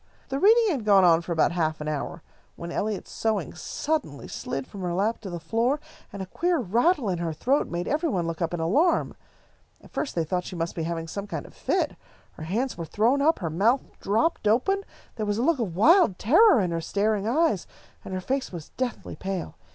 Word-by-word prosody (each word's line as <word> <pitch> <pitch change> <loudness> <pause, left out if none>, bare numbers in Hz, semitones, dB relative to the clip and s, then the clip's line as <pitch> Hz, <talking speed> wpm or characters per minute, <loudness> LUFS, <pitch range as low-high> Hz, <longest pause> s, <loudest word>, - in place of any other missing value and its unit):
The 270 0 -1
reading 445 +5 +5
had 270 -8 -2
gone 200 -2 +5
on 170 -2 +5
for 170 - -7
about 160 -1 +3
half 160 -2 -1
an 150 - -5
hour, 155 +2 -4 0.3
when 170 0 -7
Eliot's 210 +2 -3
sewing 215 -5 -1
suddenly 285 - -3
slid 135 -1 -4
from 200 - -10
her 175 -1 -2
lap 210 +5 0
to 200 - -6
the 175 -1 -5
floor, 230 - 0 0.3
and 200 -1 -5
a - - -6
queer 345 - 0
rattle 240 - +2
in 180 -3 -1
her 165 -2 -2
throat 265 - +1
made 175 0 -3
every 315 +3 0
one 180 - 0
look 165 0 -4
up 165 - 0
in 175 - -3
alarm. 275 - +2 0.6
At - - -18
first 295 - -3
they 170 - +1
thought 170 +3 -1
that 180 - -4
she - - -7
must 170 0 -2
be 165 - -3
having 165 -1 -3
some 200 +5 -5
kind - - -5
of - - -13
a - - -25
fit. - - 0 0.4
Her 155 - -9
hands 230 +6 -2
were 165 - -3
thrown 230 - +2
up, 320 +3 +4
her 165 -4 -3
mouth 225 - +2 0.2
dropped 220 +5 +1
open, 390 - +2 0.3
there 215 - -1
was 205 0 0
a 235 - 0
look 320 0 +2
of 195 -8 -2
wild 290 - +5
terror 340 - +6
in 180 -2 -1
her 165 0 -1
staring 205 +3 0
eyes, 255 - +1 0.4
and - - -8
her 185 0 -3
face 265 +6 -2
was 170 -4 -8
deathly 255 -2 -4
pale. 190 - -4
200 Hz, 230 wpm, -26 LUFS, 170-265 Hz, 0.6 s, terror